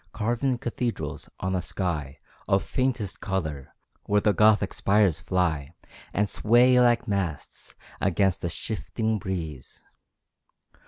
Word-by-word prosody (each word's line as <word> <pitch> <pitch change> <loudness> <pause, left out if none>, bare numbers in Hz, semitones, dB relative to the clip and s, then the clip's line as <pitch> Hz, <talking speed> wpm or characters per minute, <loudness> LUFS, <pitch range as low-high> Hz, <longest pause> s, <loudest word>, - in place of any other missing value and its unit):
Carven 120 +4 0
cathedrals, 120 0 -4
on 95 0 -1
a 90 - 0
sky 75 -9 -3 0.3
Of 95 0 +2
faintest 130 -6 -1
colour, 80 -9 -4 0.3
where 105 0 +3
the 105 0 +2
gothic 105 0 +4
spires 100 -5 +2
fly 80 -3 -1 0.4
And 105 +2 +1
sway 120 +5 +4
like 120 -1 +3
masts, 95 -7 -4 0.3
against 95 0 +1
a 85 - 0
shifting 110 +4 -2
breeze. 80 -9 -6
100 Hz, 115 wpm, -26 LUFS, 85-110 Hz, 0.4 s, gothic